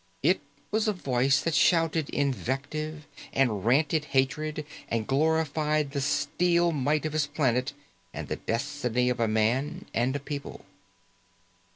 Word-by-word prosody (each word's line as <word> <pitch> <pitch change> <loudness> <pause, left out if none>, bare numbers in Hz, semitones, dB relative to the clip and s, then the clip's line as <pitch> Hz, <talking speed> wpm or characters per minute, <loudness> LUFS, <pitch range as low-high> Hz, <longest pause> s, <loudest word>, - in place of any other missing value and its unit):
It 180 +6 +3 0.3
was 220 +1 +1
a 215 - +2
voice 135 -5 +2
that 165 - -1
shouted 165 0 +3
invective 140 - -2 0.3
and 115 -8 +1
ranted 150 +5 +2
hatred 150 +3 0 0.2
and 115 -1 -1
glorified 150 +1 +1
the 140 -1 -2
steel 170 +4 +2
might 150 +1 0
of 155 - -2
his 155 -2 +1
planet 135 -3 0 0.4
and - - -6
the - - -3
destiny 125 0 -1
of 125 - -3
a 115 - +2
man 115 +7 0
and 125 +4 +1
a - - -1
people. 140 -4 -7
145 Hz, 140 wpm, -28 LUFS, 130-155 Hz, 0.4 s, It